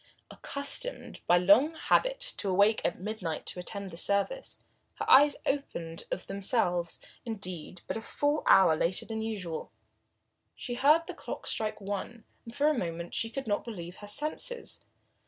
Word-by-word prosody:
Accustomed 280 - -1
by 175 - +6
long 210 - +5
habit - - +2 0.2
to 200 - -2
awake 200 +4 +4
at - - 0
midnight 185 -5 -4
to - - -5
attend 195 +1 -5
the 165 - -8
service, 200 - 0 0.4
her - - -4
eyes 290 +2 +7
opened 165 - -3
of 185 - -4
themselves, 195 -4 +1 0.2
indeed, 185 -6 -6
but - - -3
a - - -5
full 290 +6 0
hour 185 -4 +7
later 170 +3 0
than 220 -1 -4
usual. 195 -7 -4 0.8
She 245 - -5
heard 300 +7 +4
the - - -6
clock - - -7
strike 215 -1 0
one, 205 +3 -5 0.2
and 230 0 -10
for 290 - +3
a 305 - +4
moment 170 - -4 0.2
could 275 +1 -4
not 205 -2 0
believe 180 -6 -7
her 205 - -10
senses. 305 - -1
210 Hz, 155 wpm, -30 LUFS, 180-275 Hz, 0.8 s, eyes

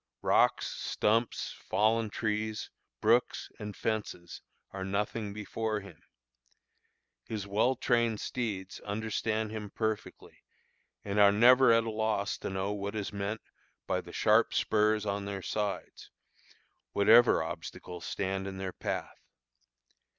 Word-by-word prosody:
Rocks, - - +3
stumps, 115 +2 0
fallen 110 +1 +1
trees, 110 0 -2 0.3
brooks, 115 +3 +2
and 105 -1 -6
fences 105 -6 -3 0.3
are 95 -1 -4
nothing 100 +2 -2
before 105 +1 -3
him. 100 - -13 1.2
His 105 -3 -4
well 110 +6 +2
trained 120 -3 +1
steeds 105 -7 -4
understand 110 +1 -2
him 105 -2 -5
perfectly, 110 0 -4 0.6
and 100 0 -1
are 100 -1 +8
never 125 +4 +6
at 115 0 +5
a 115 - -3
loss 110 -1 -1
to - - -4
know 95 +1 -2
what 100 +1 -4
is 105 -2 -3
meant 100 +2 -3 0.4
by - - 0
the - - -12
sharp - - +3
spurs 105 0 +2
on 100 0 -2
their 100 -1 -5
sides, 105 -2 -4 0.8
whatever 110 -1 +6
obstacles 90 +2 -7
stand 95 0 -2
in 95 0 -6
their 95 -1 -4
path. - - -4
105 Hz, 125 wpm, -31 LUFS, 100-110 Hz, 1.2 s, are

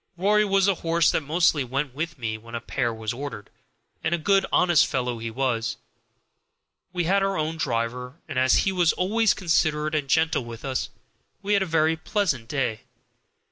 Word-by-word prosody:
(Rory 210 +4 +3
was 195 -1 +2
the 200 - +4
horse 170 -1 +2
that - - 0
mostly 155 -1 +2
went 135 +2 -3
with 160 +4 -4
me 110 -3 -3
when 115 +2 -10
a - - -2
pair 120 +1 -2
was 110 -1 -4
ordered, 130 -5 -7 0.5
and 170 - +1
a - - -3
good 195 +4 +2
honest 175 -4 +4
fellow 125 -2 -2
he 115 0 -4
was.) 115 -1 -1 1.1
We 180 -1 -1
had 195 +4 +2
our 195 0 0
own 155 +1 -2
driver, 125 -1 -2
and 130 - -2
as 130 0 +4
he 195 - +2
was 175 -3 +2
always 215 +4 +2
considerate 155 -4 +1
and 145 -3 -1
gentle 160 -3 +2
with 115 +2 -9
us, 130 -1 -2 0.5
we 205 +1 0
had 200 - +3
a 190 - -1
very 160 0 +2
pleasant 160 - -1
day. 130 -5 -1
155 Hz, 185 wpm, -25 LUFS, 125-175 Hz, 1.1 s, the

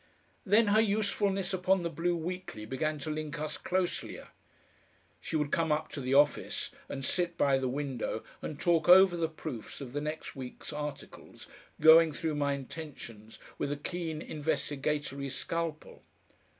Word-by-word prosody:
Then 210 +2 +5
her 215 +2 +5
usefulness 200 -2 0
upon 185 0 +2
the 170 - -1
BLUE 175 +3 0
WEEKLY 170 -9 -5
began 150 +6 -1
to 155 - -3
link 155 +1 -4
us 155 0 -3
closelier. 185 -1 -2 0.9
She - - -5
would 150 -2 0
come 165 -1 +1
up 155 +1 0
to 140 - -6
the 130 +1 0
office, 145 +1 +2 0.2
and 135 -1 -4
sit 175 +1 0
by 135 -1 +3
the 130 - -1
window, 130 -5 -3 0.2
and 150 - -5
talk 170 -1 +2
over 185 0 +8
the 165 -2 0
proofs 155 -7 -7
of 130 -3 -8
the 145 - -2
next 155 +1 -5
week's 130 +3 -7
articles, 150 -1 -7 0.3
going 160 0 +8
through 160 +1 -2
my 145 -1 +1
intentions 130 -6 -8 0.2
with 140 - -1
a 145 - -2
keen 160 0 -4
investigatory 145 -2 -2
scalpel. 160 +4 -4
155 Hz, 155 wpm, -31 LUFS, 140-175 Hz, 0.9 s, over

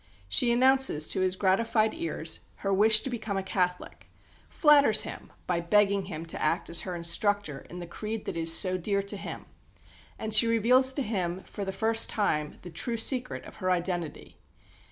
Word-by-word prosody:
She 235 - +3
announces 260 - +3
to 190 - -1
his 185 0 0
gratified 215 +4 +1
ears 335 +1 -3 0.3
her 195 - +1
wish 215 +2 +5
to - - -5
become 220 -4 -4
a 195 - -2
Catholic; 180 -1 -3 0.4
flatters 290 -7 +4
him - - -9
by 175 -2 -1
begging 200 +2 +2
him 165 -3 -7
to 165 - -7
act 165 +2 -1
as 170 - +5
her 180 -2 -5
instructor 170 -2 -1
in 175 - -9
the 175 - -7
creed 215 +5 -6
that - - -5
is 165 0 +3
so 185 +2 +4
dear 200 +2 -1
to 200 +1 -2
him; 195 - -8 0.7
and 220 0 -5
she 215 +2 +6
reveals 245 +4 +3
to 280 - -2
him 185 -5 -3
"for 205 - -7
the 195 - -4
first 225 +3 +1
time" 150 -9 -1
the 175 - -9
true 230 +8 -3
secret 255 +2 -2
of - - -13
her 185 -2 -3
identity. 175 -3 -3
200 Hz, 185 wpm, -27 LUFS, 180-225 Hz, 0.7 s, she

